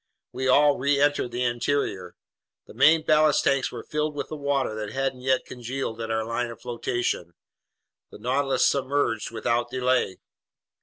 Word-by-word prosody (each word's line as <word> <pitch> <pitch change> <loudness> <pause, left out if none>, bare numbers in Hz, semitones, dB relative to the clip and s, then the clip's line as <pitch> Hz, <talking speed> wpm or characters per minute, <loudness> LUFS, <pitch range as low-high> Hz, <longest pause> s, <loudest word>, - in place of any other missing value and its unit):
We 130 +1 -3
all 145 +2 +4
reentered 140 0 +2
the 120 +1 -2
interior. 120 -7 -1 0.5
The - - -14
main 160 +1 +5
ballast 155 -1 +4
tanks 135 -1 +1
were - - -7
filled 150 0 -2
with 145 - -4
the 155 - -5
water 140 -5 -1
that 105 -1 -5
hadn't 135 0 -2
yet 130 0 +1
congealed 120 -1 -5
at 115 - -4
our 110 0 -1
line 115 +1 -2
of 115 - -10
flotation. 120 -7 -3 0.7
The - - -12
Nautilus 135 +5 +1
submerged 135 -5 0
without 120 +1 -1
delay. 125 -6 0
130 Hz, 155 wpm, -25 LUFS, 115-140 Hz, 0.7 s, main